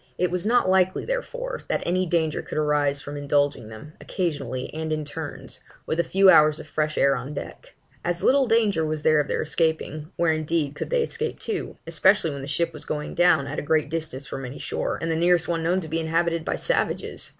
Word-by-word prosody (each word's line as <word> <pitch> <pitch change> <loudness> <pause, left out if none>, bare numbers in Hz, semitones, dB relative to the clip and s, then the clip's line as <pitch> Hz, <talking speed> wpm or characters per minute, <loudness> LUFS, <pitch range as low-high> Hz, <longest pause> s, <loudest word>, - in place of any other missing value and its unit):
It 180 -1 +1
was 180 +3 -1
not 245 -2 +3
likely, 185 0 +2
therefore, - - -3
that - - -1
any 185 +1 +1
danger 160 -2 0
could - - -7
arise 145 -2 +1
from 145 +1 -7
indulging 145 -4 0
them 110 +8 -11
occasionally, 140 -8 -3
and 160 0 -4
in 155 -1 -1
turns, 145 - -7 0.3
with 160 - -2
a - - +4
few 195 +3 +3
hours 155 -4 +6
of - - -8
fresh 155 0 -2
air 140 0 +4
on 135 +4 -6
deck. - - -8 0.3
As 175 0 -1
little 270 0 +4
danger 220 -7 +2
was 155 -1 -2
there 155 -1 +4
of 145 - 0
their - - -1
escaping; 160 0 -1
where 170 -2 +2
indeed 155 -2 -1
could - - -5
they - - +2
escape 460 0 -4
to 425 -4 -4
especially 165 +1 +3
when 140 -1 -6
the 135 - -7
ship 165 +4 -1
was 150 - -6
going 150 0 -4
down, 170 -5 +4
at - - -4
a - - -3
great 155 0 +1
distance 155 -5 -3
from 135 - -6
any 125 +2 -7
shore, - - -3
and 165 - -2
the - - +1
nearest 175 +1 +3
one 165 -1 -1
known 175 +3 +1
to 160 - -7
be 160 +1 -2
inhabited 165 +1 0
by - - -1
savages? - - -1
160 Hz, 220 wpm, -24 LUFS, 150-180 Hz, 0.3 s, hours